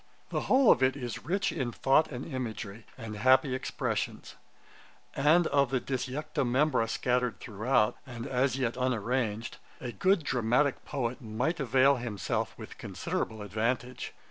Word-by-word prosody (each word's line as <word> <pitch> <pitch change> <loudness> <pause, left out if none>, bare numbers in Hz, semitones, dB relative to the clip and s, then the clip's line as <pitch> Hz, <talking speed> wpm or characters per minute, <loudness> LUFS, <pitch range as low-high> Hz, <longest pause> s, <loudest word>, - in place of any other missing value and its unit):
The - - -1
whole 260 -2 +6
of 125 - +3
it 130 +2 +3
is 120 -4 -6
rich 195 +3 +1
in 130 -6 -2
thought 135 +7 +3
and 125 -1 -5
imagery, 115 -6 -5
and 115 -3 -6
happy 130 +4 +4
expressions; 130 - -3 0.8
and 155 +5 +4
of 140 -4 +2
the 130 0 +1
disjecta 135 +3 -2
membra 130 -1 +2
scattered 125 0 0
throughout, 110 0 +1
and 120 -4 -7
as 130 +1 +1
yet 125 -3 -1
unarranged, 120 -2 -1 0.2
a 125 - -5
good 185 - +2
dramatick 125 +3 +1
poet 130 -2 -3
might 125 +9 -2
avail 135 +1 +4
himself 115 -6 -2
with - - -10
considerable 110 -1 -3
advantage. 115 +5 -2
125 Hz, 145 wpm, -30 LUFS, 115-135 Hz, 0.8 s, whole